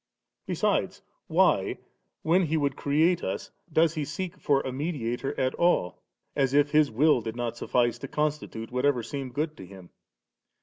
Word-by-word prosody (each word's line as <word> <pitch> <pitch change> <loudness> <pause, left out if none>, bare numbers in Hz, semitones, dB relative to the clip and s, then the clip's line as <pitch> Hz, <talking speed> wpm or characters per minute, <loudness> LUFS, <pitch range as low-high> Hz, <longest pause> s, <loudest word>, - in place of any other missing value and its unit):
Besides, - - 0 0.2
why, - - +2 0.5
when 170 +4 +4
He 160 +2 +1
would 140 -3 0
create 160 +6 +2
us, - - -4 0.2
does 160 +1 +3
He 155 -2 -2
seek 175 +5 -5
for 140 -3 +2
a 130 - -4
mediator 135 -3 -3
at 130 0 +1
all, 170 - +1 0.3
as 135 -1 +1
if 145 0 +4
His 155 -1 +4
will 135 +3 +3
did 110 0 -5
not 120 -1 -3
suffice 120 0 0
to 135 - -6
constitute 150 -7 -3
whatever 125 -1 +1
seemed 135 -2 -6
good 155 +1 -1
to 95 - -9
Him? 95 -2 -13
140 Hz, 165 wpm, -27 LUFS, 120-155 Hz, 0.5 s, when